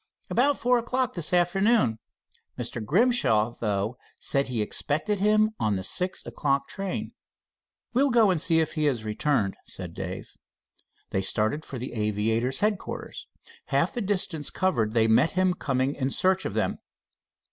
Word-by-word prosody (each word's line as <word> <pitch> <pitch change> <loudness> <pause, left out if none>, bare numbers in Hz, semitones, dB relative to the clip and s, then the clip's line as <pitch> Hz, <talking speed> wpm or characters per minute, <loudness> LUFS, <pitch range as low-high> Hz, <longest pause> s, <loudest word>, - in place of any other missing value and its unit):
"About 280 +3 +3
four 245 +1 +3
o'clock 255 +1 -1
this 170 -3 -1
afternoon. 180 - +3 0.6
Mr. 115 - -4
Grimshaw, 130 - +2
though, 105 +3 -1 0.2
said 140 0 0
he 125 -3 -2
expected 155 - -1
him 215 +2 +3
on 105 -2 +1
the 95 - -3
six 180 - -2
o'clock 140 -1 -1
train." 195 -1 -4 0.8
"We'll 275 +3 +3
go 230 -5 +5
and 170 -4 0
see 165 -1 +3
if 160 - -2
he 155 -2 0
has 125 -6 0
returned," 110 -1 0
said - - -7
Dave. - - -6 0.8
They 95 - 0
started 110 +9 0
for 135 - -7
the 125 +1 -6
aviator's 110 +4 0
headquarters. 210 -1 -3 0.4
Half - - +1
the 245 - -3
distance 185 -7 -1
covered, 115 - 0
they 115 -2 +3
met 115 +8 +4
him 185 0 +2
coming 135 -4 -1
in 135 -2 -1
search 190 +5 +1
of - - -3
them. - - 0
150 Hz, 155 wpm, -26 LUFS, -, 0.8 s, go